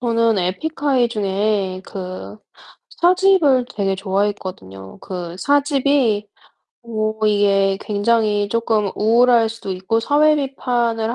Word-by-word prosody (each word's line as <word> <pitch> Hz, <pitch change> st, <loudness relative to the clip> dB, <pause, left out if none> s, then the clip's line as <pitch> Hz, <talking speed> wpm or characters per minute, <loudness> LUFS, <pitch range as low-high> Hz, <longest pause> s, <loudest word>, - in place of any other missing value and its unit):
저는 230 Hz, -2 st, +1 dB
에픽하이 260 Hz, -, 0 dB
중에 200 Hz, -3 st, -1 dB
그 185 Hz, +2 st, -8 dB, 0.6 s
4 350 Hz, +1 st, +4 dB
집을 340 Hz, -10 st, +3 dB
되게 195 Hz, -2 st, -1 dB
좋아했거든요. 190 Hz, -, -4 dB
그 175 Hz, -2 st, -7 dB
4 285 Hz, +6 st, +2 dB
집이 275 Hz, -7 st, +1 dB, 0.6 s
뭐 220 Hz, -1 st, -2 dB
이게 200 Hz, -2 st, +2 dB
굉장히 210 Hz, -1 st, 0 dB
쪼끔 220 Hz, -2 st, 0 dB
우울할 230 Hz, +1 st, +3 dB
수도 225 Hz, -3 st, -8 dB
있고 190 Hz, +5 st, -1 dB
사회 295 Hz, +5 st, +3 dB
비판을 240 Hz, -5 st, -1 dB
220 Hz, 225 characters per minute, -19 LUFS, 195-245 Hz, 0.6 s, 4